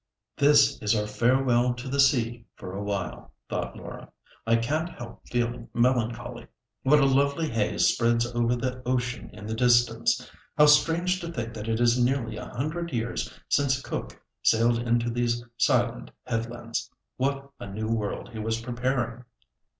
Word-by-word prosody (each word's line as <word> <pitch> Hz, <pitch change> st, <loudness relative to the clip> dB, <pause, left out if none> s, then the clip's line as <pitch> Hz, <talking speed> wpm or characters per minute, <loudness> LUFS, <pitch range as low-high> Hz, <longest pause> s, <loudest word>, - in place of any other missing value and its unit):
"This 140 Hz, -1 st, +4 dB
is 105 Hz, +1 st, +2 dB
our 105 Hz, -1 st, 0 dB
farewell 120 Hz, +2 st, +2 dB
to 120 Hz, +2 st, -7 dB
the 140 Hz, +2 st, -2 dB
sea 120 Hz, -4 st, +2 dB
for 90 Hz, -1 st, -8 dB
a 100 Hz, -, -4 dB
while," 100 Hz, -2 st, -4 dB
thought -, -, -4 dB
Laura. -, -, -9 dB, 0.4 s
"I 115 Hz, -, +5 dB
can't 150 Hz, +9 st, 0 dB
help 120 Hz, -7 st, -10 dB
feeling 120 Hz, -1 st, -2 dB
melancholy. 120 Hz, -2 st, 0 dB, 0.3 s
What 150 Hz, +3 st, +5 dB
a 140 Hz, -, +4 dB
lovely 140 Hz, +4 st, +2 dB
haze 115 Hz, -6 st, +1 dB
spreads 115 Hz, 0 st, +3 dB
over 120 Hz, 0 st, 0 dB
the 125 Hz, +1 st, -3 dB
ocean 125 Hz, -1 st, -2 dB
in 105 Hz, -, -10 dB
the 110 Hz, -, -3 dB
distance! 120 Hz, -1 st, +3 dB, 0.3 s
How 150 Hz, -, +8 dB
strange 165 Hz, +5 st, +4 dB
to 170 Hz, -1 st, -5 dB
think 120 Hz, -6 st, -4 dB
that 110 Hz, 0 st, -6 dB
it 110 Hz, 0 st, 0 dB
is 120 Hz, +1 st, +3 dB
nearly 125 Hz, -2 st, 0 dB
a -, -, -6 dB
hundred 160 Hz, +6 st, -3 dB
years 115 Hz, -2 st, -2 dB, 0.2 s
since 135 Hz, -2 st, +2 dB
Cook -, -, -6 dB, 0.2 s
sailed 115 Hz, +1 st, +3 dB
into 120 Hz, 0 st, +1 dB
these 120 Hz, 0 st, -1 dB
silent 120 Hz, -, +1 dB, 0.2 s
headlands. 115 Hz, -1 st, -3 dB, 0.3 s
What 140 Hz, +1 st, -2 dB
a -, -, -7 dB
new 105 Hz, +3 st, -4 dB
world 110 Hz, -3 st, -2 dB
he 110 Hz, -, -8 dB
was 110 Hz, +1 st, -1 dB
preparing! 120 Hz, 0 st, -2 dB
120 Hz, 160 wpm, -27 LUFS, 115-135 Hz, 0.4 s, How